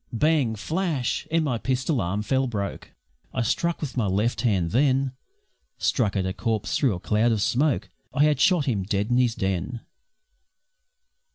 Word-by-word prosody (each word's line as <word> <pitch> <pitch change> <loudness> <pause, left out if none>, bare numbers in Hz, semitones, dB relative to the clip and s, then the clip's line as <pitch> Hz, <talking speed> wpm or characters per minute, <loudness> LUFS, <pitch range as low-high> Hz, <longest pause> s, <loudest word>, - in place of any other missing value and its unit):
Bang! 140 -2 +2
flash! 155 - -2
and 165 0 +1
my 125 -5 -1
pistol 130 +1 0
arm 100 +5 -2
fell 130 +4 +1
broke; 100 -4 -4 0.5
I 130 - +1
struck 170 +9 0
with 145 -4 -4
my 120 -5 +1
left 105 +5 0
hand 95 -9 +1
then 135 +1 +2 0.7
Struck 110 -7 +1
at 95 -2 0
a 95 - -2
corpse 110 -1 -1
through 130 -9 +2
a - - -6
cloud 110 +5 +2
of 110 - +1
smoke 140 +2 +1 0.2
I 140 +2 +2
had 150 -3 +3
shot 175 -2 +4
him 115 -8 0
dead 100 +3 -1
in 120 - +4
his 120 -2 +2
den! 95 +5 -2
120 Hz, 170 wpm, -25 LUFS, 105-140 Hz, 0.7 s, shot